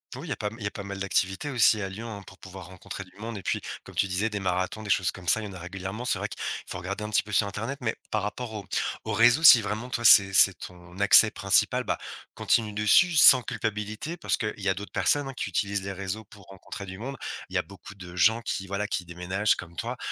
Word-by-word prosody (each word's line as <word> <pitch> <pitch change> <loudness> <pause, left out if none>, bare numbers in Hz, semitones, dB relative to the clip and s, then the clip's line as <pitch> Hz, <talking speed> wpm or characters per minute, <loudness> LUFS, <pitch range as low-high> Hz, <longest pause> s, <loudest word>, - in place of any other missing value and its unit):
Oui, 140 +7 -9
il - - -8
y 135 - -1
a - - -6
pas 105 -1 -3
il 110 - -10
y - - -1
a - - -5
pas 100 - -8
mal 100 0 -7
d'activités 95 +6 -1
aussi 115 -4 +3
à 95 - -4
Lyon, 110 +5 -8
hein, 100 -3 -8
pour - - -15
pouvoir 95 -1 -11
rencontrer 95 +2 -9
du 90 - -21
monde 110 0 -7
et 95 - -9
puis, - - -1 0.2
comme - - -14
tu 100 - +1
disais 95 +4 -1
des 105 -1 -4
marathons, 95 +2 -2
des 105 - -8
choses 90 -3 +2
comme 90 -2 -13
ça, 110 +6 +4
il 105 - -6
y - - -6
en - - -10
a 95 - -9
régulièrement. 95 +6 -7
C'est - - 0
vrai - - -4
qu'il - - -10 0.3
faut - - -5
regarder 100 +4 -5
un 105 - -5
petit 105 - +1
peu 105 0 -10
sur 105 - +3
internet. 110 +8 -5
Mais 110 -2 -2 0.2
par 110 - 0
rapport 110 +2 -5
aux-aux 105 -3 -4
réseaux, 120 +7 +4
si 125 -7 +9
vraiment, 105 +4 -5
toi, 120 -1 -3
c'est 100 -3 +8
c'est 95 - +7
ton 90 0 -12
accès 100 - +7
principal, - - +2
bah, - - -2 0.4
continue 110 -2 0
dessus 105 - +3
sans 135 -3 +9
culpabilité 110 +7 -5
parce 175 - -2
qu'il 110 -1 -3
y 100 -1 -2
a - - +2
d'autres 100 +2 -9
personnes, 145 -1 +2
hein, 135 - -7
qui - - -4
utilisent 100 +1 -2
les 100 - -5
réseaux 100 +3 -5
pour 100 0 -17
rencontrer 95 +1 -10
du 95 0 -9
monde. 135 +5 -7 0.3
Il - - -10
y - - +3
a - - +2
beaucoup 100 +1 -14
de 90 -2 -11
gens 110 +7 +3
qui, 95 -4 -4
voilà, 100 +2 -3
qui 105 -4 -3
déménagent 90 +4 -1
comme 85 -1 -11
toi, 120 +6 -5
100 Hz, 270 wpm, -26 LUFS, 95-110 Hz, 0.4 s, si